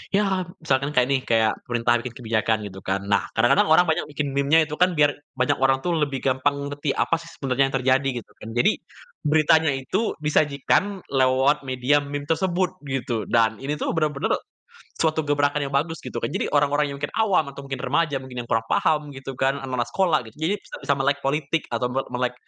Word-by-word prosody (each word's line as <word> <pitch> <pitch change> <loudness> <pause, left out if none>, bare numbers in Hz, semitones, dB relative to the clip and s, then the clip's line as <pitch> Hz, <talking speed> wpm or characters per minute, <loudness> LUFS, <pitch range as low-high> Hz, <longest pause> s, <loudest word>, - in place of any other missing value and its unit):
ya 190 -3 +1 0.2
misalkan 140 0 0
kayak 125 0 +4
nih, 135 - +3
kayak 110 -1 +3 0.2
pemerintah 120 0 +2
bikin 120 0 -7
kebijakan 110 -2 0
gitu 95 -2 -8
kan, 95 +1 -2
nah 100 - +2
kadang-kadang 120 +7 +4
orang 160 +3 +6
banyak 160 -1 0
bikin 145 -1 -3
meme-nya 140 +4 +3
itu 150 0 -6
kan 180 0 +3
biar 145 -1 +4 0.2
banyak 130 -1 +1
orang 135 0 +2
tuh 175 - 0
lebih 140 -3 -1
gampang 130 +2 +1 0.2
ngerti 145 -1 -2
apa 165 - +1
sih 165 - -12
sebenarnya 135 0 +1
yang 135 - -4
terjadi 130 +1 +2 0.2
gitu - - -28
kan. 110 - -8
Jadi 120 - +4 0.5
beritanya 160 +1 +4
itu 185 - -2
disajikan 155 +6 +1
lewat 135 +2 +3
media 130 +3 +2
meme 145 0 -5
tersebut 180 +3 0 0.2
gitu. 120 -5 -2
Dan 110 -1 +2
ini 145 +3 -2
tuh - - -2
bener-bener 150 -3 0 0.7
suatu 160 -1 +1
gebrakan 145 0 +1
yang 140 - -6
bagus 160 +4 0
gitu - - -5
kan. - - -1
Jadi 185 +7 -3
orang-orang 145 0 +3
yang - - -5
mungkin 145 - -2
awam 195 -9 +2
atau 140 0 -10
mungkin 135 -2 -5
remaja 145 0 0
mungkin 125 -2 -6
yang - - -22
kurang 115 -1 +1
paham 150 -1 +1
gitu 135 0 -7
kan, 135 +2 0
anak-anak 130 -3 -3
sekolah 175 -2 +2
gitu. 110 - -24
Jadi 160 +5 0
bisa - - -10
bisa 140 - +3
melek 140 +1 +2
politik 145 +2 0
atau 125 +1 0
nggak 135 +2 -2
melek 125 0 -1
140 Hz, 205 wpm, -24 LUFS, 130-155 Hz, 0.7 s, orang